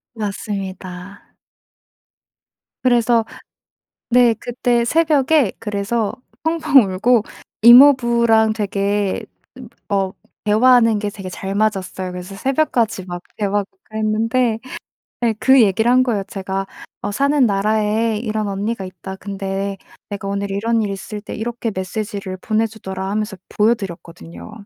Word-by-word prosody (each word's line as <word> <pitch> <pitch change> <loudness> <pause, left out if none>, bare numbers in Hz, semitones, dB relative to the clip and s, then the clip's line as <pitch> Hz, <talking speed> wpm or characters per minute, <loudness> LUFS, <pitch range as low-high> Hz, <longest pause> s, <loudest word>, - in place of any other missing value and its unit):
맞습니다. 195 -2 -6 1.5
그래서 235 -2 +3 0.8
네 240 -1 +5
그때 240 -1 0
새벽에 300 - +3
그래서 210 0 -2 0.3
펑펑 315 -6 +4
울고 230 +3 +3 0.4
이모부랑 235 -3 +6
되게 200 -1 -1 0.3
음 250 -3 -10 0.2
어 195 -2 0 0.3
대화하는 230 +1 +5
게 205 -1 -2
되게 195 -2 -9
잘 195 +2 -5
맞았어요. 190 -3 -1
그래서 180 +2 -8
새벽까지 245 -5 0
막 175 0 -6 0.2
대화하고 205 -1 -1 0.2
그랬는데 220 +2 0 0.6
네 230 -2 +2
그 265 -1 +6
얘기를 220 +4 +2
한 255 +1 +5
거예요 215 -6 0
제가. 195 -1 -4 0.4
어 - - -2
"사는 280 +3 +2
나라에 215 +2 +1
이런 215 -2 -2
언니가 200 +1 -3
있다. 185 +1 -8
근데 195 0 -4 0.3
내가 200 -1 -5
오늘 200 0 -3
이런 225 +3 0
일 205 - -2
있을 205 +2 -6
때 - - -7
이렇게 230 0 -3
메시지를 195 0 -4
보내 220 +4 0
주더라." 190 -3 -6
하면서 210 -1 -2
보여드렸거든요. 195 -4 -3
215 Hz, 275 characters per minute, -19 LUFS, 195-235 Hz, 1.5 s, 이모부랑